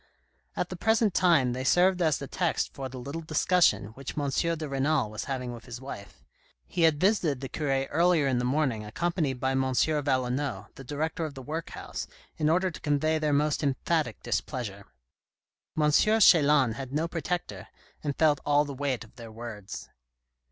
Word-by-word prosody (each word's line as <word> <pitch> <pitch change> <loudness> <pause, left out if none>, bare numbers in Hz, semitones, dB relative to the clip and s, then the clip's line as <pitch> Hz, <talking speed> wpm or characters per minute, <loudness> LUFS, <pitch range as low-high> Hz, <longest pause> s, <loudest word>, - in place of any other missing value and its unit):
At - - -2
the - - -5
present 220 -2 +2
time 165 -10 +3
they 130 +1 -3
served 180 +6 +3
as 160 -4 +3
the 140 - -6
text 175 +4 -1
for 135 -1 -5
the 130 - -9
little 140 +6 -5
discussion 160 - +2
which 135 +6 -8
M. 145 -2 -1
de 165 +1 -1
Renal 135 -3 0
was 105 -1 -5
having 125 -3 -3
with 115 -2 -10
his 120 - -8
wife. 100 - -10 0.4
He 175 - -3
had 160 -3 +4
visited 180 - +2
the 135 - -5
cure 135 -2 -1
earlier 170 0 +3
in 130 -3 +1
the - - -1
morning 125 -4 0
accompanied 145 - -1
by 130 +1 0
M 135 0 +1
Valenod, 130 -5 0
the 135 - -11
director 155 +5 -3
of 155 -3 -5
the 135 - -8
workhouse, 160 +4 -5 0.3
in 155 -1 +1
order 185 +3 +2
to - - -10
convey 155 +2 +1
their 155 -1 0
most 145 +1 +1
emphatic 155 +3 -1
displeasure. 100 -7 -3 0.9
M. 150 0 +3
Chelan 150 - +5
had 130 +1 -7
no 155 +4 0
protector, 165 - -4 0.4
and 145 -2 -2
felt 150 -3 +4
all 145 0 +3
the 140 - -6
weight 135 -3 -2
of 110 - -19
their 115 -2 -9
words. 110 -3 -8
145 Hz, 180 wpm, -28 LUFS, 130-160 Hz, 0.9 s, Chelan